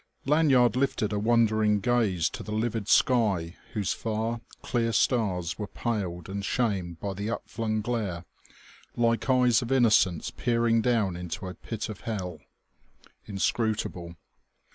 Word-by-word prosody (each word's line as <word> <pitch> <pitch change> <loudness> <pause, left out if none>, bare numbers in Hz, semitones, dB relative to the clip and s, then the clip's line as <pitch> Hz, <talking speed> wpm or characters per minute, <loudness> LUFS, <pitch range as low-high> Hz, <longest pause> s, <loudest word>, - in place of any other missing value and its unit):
Lanyard 135 -6 +4
lifted 125 -5 0
a 105 - 0
wondering 110 -2 +3
gaze 105 -7 +1
to - - -7
the 105 - -7
livid 110 -1 -1
sky 100 -11 +2 0.2
whose 105 -5 0
far, 115 +1 -2 0.2
clear 115 -2 0
stars 95 -8 +1
were 105 - -3
paled 95 -7 -3
and 100 +1 -4
shamed 95 -8 -1
by 100 -1 -3
the 100 +3 -4
up 115 - -4
flung 110 -2 -2
glare, 105 -7 -3 0.7
like 115 +2 +1
eyes 125 -3 +4
of 120 +1 -5
innocence 110 - +3
peering 115 -1 +1
down 110 -7 +1
into 90 +1 -5
a 90 - -5
pit 110 +3 -5
of 105 -3 -8
hell. 90 -7 -4 0.9
Inscrutable! 100 -4 -2
110 Hz, 140 wpm, -27 LUFS, 95-120 Hz, 0.9 s, Lanyard